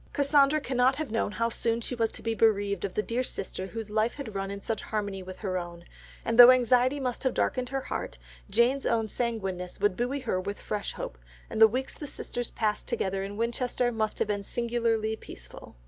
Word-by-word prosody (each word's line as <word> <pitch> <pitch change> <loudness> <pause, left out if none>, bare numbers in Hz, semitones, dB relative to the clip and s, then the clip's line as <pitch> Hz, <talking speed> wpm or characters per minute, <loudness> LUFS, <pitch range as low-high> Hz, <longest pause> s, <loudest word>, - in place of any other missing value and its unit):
Cassandra 285 +1 +4
cannot 260 -1 +2
have 295 -5 -4
known 225 -2 0
how 230 +1 0
soon 230 0 0
she 235 - -4
was 230 -2 0
to - - -7
be 225 0 0
bereaved 205 -4 +2
of 195 -2 -3
that 210 - 0
dear 235 +2 0
sister 190 -6 -4
whose 220 0 -6
life 220 +2 +1
had 275 -7 -6
run 195 0 -3
in 200 0 -5
such 220 +2 -3
harmony 205 -3 -3
with 185 0 -8
her 185 -3 -1
own, 170 -1 -8 0.4
and 230 +1 0
though 245 0 +13
anxiety 255 +2 +4
must 250 -3 -2
have 260 - 0
darkened 250 -1 0
her 270 0 -2
heart, - - -4 0.3
Jane's 235 +6 +2
own 225 -1 +1
sanguineness 195 -7 -3
would 205 -3 +2
buoy 255 +5 -1
her 185 -7 -1
with 200 +2 -5
fresh 210 -1 -3
hope, - - -6 0.3
and 220 - -2
the 220 - +11
weeks 255 +5 -3
the 295 - -7
sisters 245 -3 -4
passed 215 -2 -1
together 195 0 -1
in 200 +1 -6
Winchester 240 +1 0
must 220 -2 -1
have - - 0
been 205 -1 -1
singularly 230 0 0
peaceful. - - -11
225 Hz, 210 wpm, -28 LUFS, 200-245 Hz, 0.4 s, though